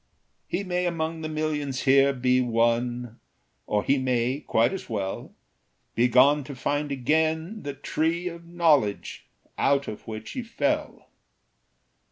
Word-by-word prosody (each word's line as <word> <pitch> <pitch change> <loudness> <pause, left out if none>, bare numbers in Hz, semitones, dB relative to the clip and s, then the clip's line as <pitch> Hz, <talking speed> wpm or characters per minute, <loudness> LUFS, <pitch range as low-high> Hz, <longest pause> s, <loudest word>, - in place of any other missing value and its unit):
He 185 +3 -2
may 180 -1 -1
among 165 -1 -2
the 155 - -4
millions 150 -4 -2
here 135 0 +5
Be 125 -1 +2
one; 120 0 0 0.5
or 105 -1 +1
he 140 0 +2
may, 130 +1 0
quite 115 +3 +1
as 190 - -6
well, 100 -4 -4 0.6
Be 120 +2 +3
gone 135 +4 +5
to 140 -1 -8
find 145 +3 -2
again 160 - 0
the 145 -1 -5
Tree 165 +5 -1
Of 170 -1 -8
Knowledge, 155 -12 +1 0.3
out 140 0 +2
of 105 - -8
which 110 0 -6
he 255 - -4
fell. 290 +6 -2
140 Hz, 140 wpm, -26 LUFS, 125-160 Hz, 0.6 s, here